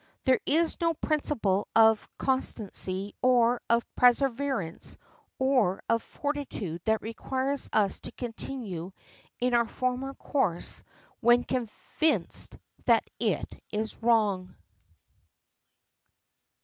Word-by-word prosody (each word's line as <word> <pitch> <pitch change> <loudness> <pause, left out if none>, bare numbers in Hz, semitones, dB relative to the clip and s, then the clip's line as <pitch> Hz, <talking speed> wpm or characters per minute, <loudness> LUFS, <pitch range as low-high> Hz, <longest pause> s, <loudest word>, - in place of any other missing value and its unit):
There 260 -2 +4
is 325 +3 +2
no 335 -1 +2
principle 235 - 0
of 220 -1 +5
constancy 205 -6 -1
or 245 -1 +4
of 235 0 +3
perseverance 250 -7 +1 0.4
or 255 -8 +2
of 230 0 +2
fortitude 275 - -4
that 220 0 +1
requires 260 +5 -2
us 205 -3 +2
to - - -7
continue 225 -7 -5 0.5
in 250 0 +1
our 235 -1 +4
former 255 +2 -2
course 205 - -1 0.4
when 240 +1 +5
convinced 255 +6 -1 0.3
that - - +4
it - - -1
is 220 +1 -3
wrong. 210 -6 +2
235 Hz, 95 wpm, -28 LUFS, 210-265 Hz, 0.5 s, of